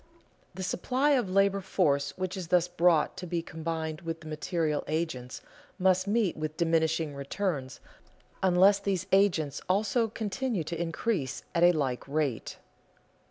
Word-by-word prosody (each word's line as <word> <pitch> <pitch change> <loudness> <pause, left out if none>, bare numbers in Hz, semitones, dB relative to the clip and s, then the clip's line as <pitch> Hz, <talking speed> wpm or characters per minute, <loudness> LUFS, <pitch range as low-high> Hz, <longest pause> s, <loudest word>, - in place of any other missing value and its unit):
The 190 - -5
supply 260 +11 +1
of 250 -8 +2
labor 195 +1 +3
force 145 -7 0
which 185 -1 -3
is 185 -3 -5
thus 180 0 +3
brought 175 -3 +2
to 180 -1 -6
be 170 0 -2
combined 160 -1 -4
with 165 -1 -5
the 155 - -11
material 155 0 -1
agents 155 -6 -3 0.4
must 185 0 +2
meet 210 -3 +1
with 155 0 -4
diminishing 160 -2 +1
returns 140 -1 -3 0.6
unless 190 +2 +5
these 195 -3 -1
agents 180 -7 +2
also 215 +4 +2
continue 220 -1 -2
to 170 +2 -4
increase 165 - -2
at 170 - +1
a 175 +1 +7
like 135 -7 -2
rate. 140 -5 -2
170 Hz, 145 wpm, -29 LUFS, 155-195 Hz, 0.6 s, a